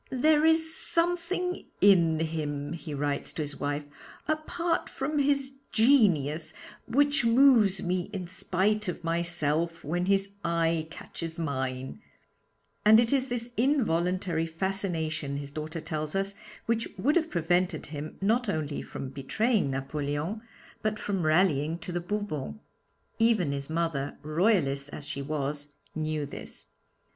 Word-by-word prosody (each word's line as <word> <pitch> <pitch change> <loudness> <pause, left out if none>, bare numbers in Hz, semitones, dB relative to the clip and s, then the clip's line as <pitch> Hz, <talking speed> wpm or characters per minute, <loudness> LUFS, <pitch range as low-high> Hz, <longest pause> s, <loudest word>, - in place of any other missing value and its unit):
'There 305 +4 +4
is 320 0 +3
something 350 +1 -1 0.2
in 170 -5 +5
him,' 150 -2 -2
he 165 -1 -7
writes 145 0 -1
to 155 - -3
his 145 -1 -6
wife, 145 +1 -2 0.4
'apart 330 +2 -1
from 295 +2 -2
his 275 -1 +1 0.2
genius, 175 - +3 0.3
which 285 +2 +3
moves 230 -5 +5
me 180 +1 -1
in 190 -4 -4
spite 195 +3 0
of 175 -1 -4
myself 165 -1 -1
when 175 +4 -1
his 195 0 +2
eye 165 -1 +1
catches 165 0 -7
mine,' 130 0 -3 0.8
and 220 +1 +8
it 235 +2 +2
is 265 -1 +2
this 240 -1 -4
involuntary 180 - +1
fascination, 160 -5 -2
his 140 0 -6
daughter 155 +3 -5
tells 155 +1 -3
us, 195 +1 0 0.3
which 230 0 0
would 275 +11 +2
have 330 -2 +2
prevented 175 +1 +1
him 150 0 -7
not 225 +3 +2
only 155 -4 -2
from 135 - -6
betraying 190 - 0
Napoleon, 145 +8 -2 0.4
but 215 0 0
from 200 -3 -2
rallying 155 -2 +3
to 170 +1 -6
the 175 0 -2
Bourbons. 175 - -3 0.6
Even 220 -9 +3
his 140 0 -4
mother, 160 -4 -1
Royalist 155 -4 +2
as 145 - -8
she 140 - -3
was, 145 0 -3 0.2
knew 155 -1 -2
this. - - -10
170 Hz, 135 wpm, -28 LUFS, 150-220 Hz, 0.8 s, and